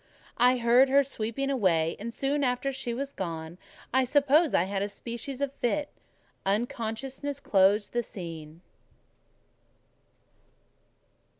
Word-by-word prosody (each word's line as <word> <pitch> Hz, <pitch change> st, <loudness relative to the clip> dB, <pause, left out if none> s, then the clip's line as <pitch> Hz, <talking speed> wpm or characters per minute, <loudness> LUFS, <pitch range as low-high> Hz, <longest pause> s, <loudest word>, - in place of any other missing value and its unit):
I 250 Hz, +1 st, +5 dB
heard 245 Hz, +3 st, +5 dB
her 280 Hz, +1 st, +5 dB
sweeping 270 Hz, +1 st, -3 dB
away; 170 Hz, -10 st, +2 dB
and 230 Hz, +3 st, -5 dB
soon 280 Hz, +4 st, -1 dB
after 250 Hz, +1 st, 0 dB
she 265 Hz, -2 st, -4 dB
was 275 Hz, +4 st, -4 dB
gone, 165 Hz, -1 st, -5 dB, 0.3 s
I 260 Hz, 0 st, +4 dB
suppose 290 Hz, +4 st, +3 dB
I -, -, +4 dB
had 195 Hz, +1 st, -2 dB
a 200 Hz, -, -1 dB
species 240 Hz, +5 st, -6 dB
of 280 Hz, -1 st, -1 dB
fit: 285 Hz, +3 st, -1 dB, 0.5 s
unconsciousness 245 Hz, +6 st, -2 dB
closed 200 Hz, -3 st, +3 dB
the 240 Hz, -, +1 dB
scene. 165 Hz, -6 st, -8 dB
240 Hz, 120 wpm, -28 LUFS, 200-275 Hz, 0.5 s, I